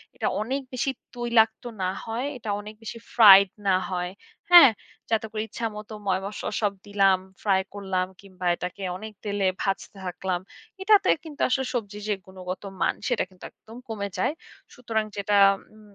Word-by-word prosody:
এটা -, -, -1 dB
অনেক 260 Hz, +6 st, -2 dB
বেশি 255 Hz, +2 st, 0 dB, 0.2 s
তৈলাক্ত 235 Hz, -2 st, +2 dB, 0.2 s
না 185 Hz, -, +1 dB, 0.2 s
হয়। 230 Hz, +3 st, -3 dB
এটা 220 Hz, -3 st, -7 dB
অনেক 210 Hz, +1 st, -9 dB
বেশি 230 Hz, +1 st, -6 dB, 0.2 s
ফ্রাইড 200 Hz, -4 st, +9 dB, 0.2 s
না 190 Hz, -, +5 dB
হয়। 180 Hz, -1 st, -2 dB, 0.4 s
হ্যাঁ? 335 Hz, -9 st, +11 dB, 0.4 s
যাতে 225 Hz, -1 st, +1 dB
করে 215 Hz, -, -2 dB
ইচ্ছামত 215 Hz, -1 st, -5 dB, 0.2 s
ময়-মসলা 195 Hz, +2 st, -2 dB
সব 205 Hz, -2 st, +1 dB
দিলাম, 195 Hz, -2 st, +4 dB, 0.2 s
ফ্রাই 195 Hz, -2 st, +3 dB
করলাম 190 Hz, -2 st, -2 dB
কিংবা 185 Hz, -2 st, -9 dB
এটাকে 180 Hz, +3 st, -6 dB
অনেক 215 Hz, +2 st, -9 dB
তেলে 200 Hz, -2 st, 0 dB
ভাজতে 195 Hz, 0 st, -3 dB
থাকলাম। 180 Hz, 0 st, -2 dB, 0.4 s
এটাতে 410 Hz, 0 st, +5 dB
কিন্তু 310 Hz, -3 st, -9 dB
আসলে 265 Hz, +1 st, 0 dB
সবজির 210 Hz, -4 st, -4 dB
যে -, -, +3 dB
গুণগতমান, 185 Hz, 0 st, -3 dB
সেটা 245 Hz, -4 st, +1 dB
কিন্তু 185 Hz, -1 st, -19 dB
একদম 225 Hz, +2 st, -14 dB
কমে 200 Hz, -3 st, -4 dB
যায়। 190 Hz, -, +1 dB, 0.4 s
সুতরাং 225 Hz, -4 st, -2 dB
যেটা 200 Hz, 0 st, +1 dB, 0.4 s
উম 215 Hz, -1 st, -18 dB
205 Hz, 155 wpm, -26 LUFS, 190-225 Hz, 0.4 s, হ্যাঁ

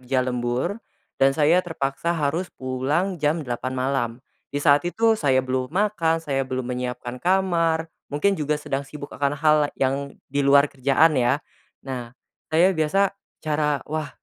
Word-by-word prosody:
kerja 130 Hz, 0 st, 0 dB
lembur, 125 Hz, -, -2 dB, 0.4 s
dan 135 Hz, 0 st, +4 dB
saya 160 Hz, +4 st, +4 dB
terpaksa 165 Hz, 0 st, -2 dB
harus 160 Hz, +4 st, -1 dB
pulang 145 Hz, +8 st, -1 dB
jam 150 Hz, +1 st, +1 dB
8 125 Hz, +1 st, -3 dB
malam, 130 Hz, -2 st, 0 dB, 0.4 s
di -, -, -6 dB
saat 145 Hz, 0 st, +4 dB
itu 225 Hz, +5 st, +3 dB
saya 135 Hz, -11 st, +2 dB
belum 130 Hz, 0 st, -1 dB
makan 165 Hz, -2 st, 0 dB
saya 135 Hz, -3 st, 0 dB
belum 130 Hz, -1 st, -3 dB
menyiapkan 125 Hz, 0 st, -5 dB
kamar, 175 Hz, -3 st, +2 dB, 0.2 s
mungkin 150 Hz, +8 st, +1 dB
juga 150 Hz, -5 st, -1 dB
sedang 140 Hz, -2 st, -3 dB
sibuk 145 Hz, +1 st, -9 dB
akan 140 Hz, 0 st, -1 dB
hal 155 Hz, +1 st, +4 dB, 0.2 s
yang 140 Hz, +1 st, -1 dB
di 140 Hz, +1 st, -2 dB
luar 140 Hz, +1 st, +4 dB
kerjaan 140 Hz, +4 st, +3 dB
ya, 120 Hz, +2 st, +3 dB, 0.5 s
nah, 125 Hz, -2 st, -6 dB, 0.3 s
saya 170 Hz, +4 st, +4 dB
biasa 185 Hz, +4 st, +1 dB, 0.3 s
cara 150 Hz, -2 st, 0 dB
wah 155 Hz, 0 st, -3 dB
145 Hz, 150 wpm, -23 LUFS, 130-165 Hz, 0.5 s, dan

